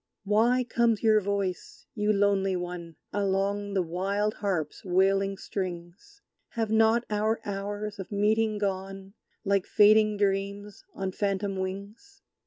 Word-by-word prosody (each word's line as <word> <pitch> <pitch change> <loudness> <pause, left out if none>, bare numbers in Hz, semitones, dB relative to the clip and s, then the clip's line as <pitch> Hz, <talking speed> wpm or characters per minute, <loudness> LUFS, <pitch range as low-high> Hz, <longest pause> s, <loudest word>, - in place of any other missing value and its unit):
Why 230 +5 +3
comes 235 -2 +1
your 215 -1 +5
voice, 200 -2 -3
you 210 -1 +1
lonely 200 -2 +2
One, 175 -2 -6 0.2
Along 200 0 -1
the 190 - +2
wild 195 +5 -1
harp's 180 -8 -3
wailing 195 +1 +2
strings? 185 - -7 0.3
Have 225 -2 -2
not 225 +2 +3
our 215 +2 +1
hours 205 +1 -4
of 190 - -7
meeting 215 +1 +1
gone, 195 -1 -4 0.3
Like 200 -1 +1
fading 215 0 +5
dreams 200 0 -2
on 190 -1 -3
phantom 200 0 -1
wings? 200 - -7
200 Hz, 125 wpm, -28 LUFS, 195-215 Hz, 0.3 s, your